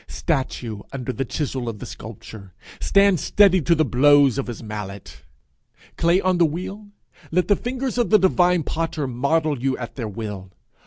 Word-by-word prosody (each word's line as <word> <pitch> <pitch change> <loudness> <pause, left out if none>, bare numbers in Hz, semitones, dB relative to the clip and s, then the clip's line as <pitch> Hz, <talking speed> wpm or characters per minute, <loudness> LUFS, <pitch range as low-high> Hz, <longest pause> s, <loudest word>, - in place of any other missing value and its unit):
Statue 130 - -3
under 130 -2 -4
the 135 - -3
chisel 130 -2 -3
of 110 - -6
the - - -8
sculptor, 100 -5 -11 0.2
stand 200 -3 +3
steady 190 0 +4
to 170 +3 +3
the 155 -1 +2
blows 140 0 +4
of 135 - -3
his 120 -1 -7
mallet. 100 - -8 0.7
Clay 170 +2 +3
on 185 -2 +1
the - - +6
wheel, 190 +6 -6 0.4
let 180 +1 +1
the 205 - +4
fingers 255 +2 -3
of 240 - +1
the 215 - +6
divine 180 -3 +3
potter 160 -2 -3
model 140 +3 0
you 135 0 0
at 120 -1 -7
their 120 -4 -3
will. 100 -3 -7
145 Hz, 170 wpm, -22 LUFS, 120-180 Hz, 0.7 s, the